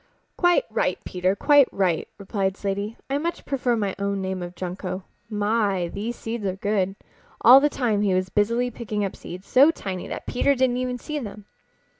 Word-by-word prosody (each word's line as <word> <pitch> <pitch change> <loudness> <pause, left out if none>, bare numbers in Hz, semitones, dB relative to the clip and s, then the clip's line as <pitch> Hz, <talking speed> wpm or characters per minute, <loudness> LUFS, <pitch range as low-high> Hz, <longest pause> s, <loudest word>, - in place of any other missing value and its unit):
"Quite 350 +7 +3
right, - - 0
Peter, 185 +1 0
quite 290 +4 +5
right," 180 -4 0
replied 195 -1 -2
Slaty. 200 +2 -3
"I 275 +1 0
much 340 +3 -3
prefer 255 -3 0
my 205 -4 -1
own 200 0 -1
name 190 -1 -3
of 175 0 -7
Junco. 185 +1 -5 0.3
My, 205 -4 0
these 220 +6 -4
seeds 225 -1 -5
are 190 -2 -1
good!" 195 -1 0 0.5
All 255 +3 +9
the 295 +2 +3
time 230 -7 0
he 195 -3 +2
was 185 0 0
busily 235 +5 +1
picking 210 -3 -3
up 195 - -5
seeds 185 +2 -9
so 275 +4 +6
tiny 190 - -4
that - - -6
Peter 280 +3 +2
didn't 255 -1 +2
even 250 0 -2
see 300 +4 -4
them. 210 -4 -8
205 Hz, 185 wpm, -24 LUFS, 190-245 Hz, 0.5 s, All